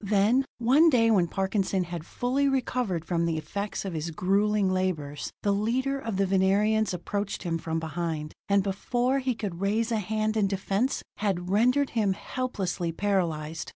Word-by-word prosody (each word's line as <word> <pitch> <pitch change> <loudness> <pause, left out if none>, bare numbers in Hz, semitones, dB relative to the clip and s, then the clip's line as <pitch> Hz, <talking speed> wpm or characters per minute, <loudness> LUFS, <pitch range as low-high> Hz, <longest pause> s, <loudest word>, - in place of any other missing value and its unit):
Then, 210 +6 +3
one 270 +8 +5
day 230 -5 +4
when 185 -5 +3
Parkinson 190 0 0
had 170 -2 -6
fully 270 +3 0
recovered 245 - -1
from 170 -1 0
the 165 -1 0
effects 200 +7 -4
of 190 - -3
his 160 +1 -3
grueling 200 +4 +1
labors, 165 -6 -2
the 205 - +2
leader 250 +7 0
of 225 -7 -4
the 195 - +2
Venerians 195 +3 +2
approached 200 +3 -3
him 165 -2 -1
from 160 0 -2
behind, 160 -1 -3 0.2
and 200 -1 +4
before 245 +7 0
he 255 -2 -1
could 195 -5 -5
raise 220 +4 +1
a 225 - +1
hand 215 +2 -1
in 210 -2 +2
defense, 195 +6 -1
had 185 -3 -1
rendered 250 +7 +3
him 210 -4 +1
helplessly 190 -8 -3
paralyzed. 165 -5 -1
200 Hz, 165 wpm, -27 LUFS, 175-225 Hz, 0.2 s, one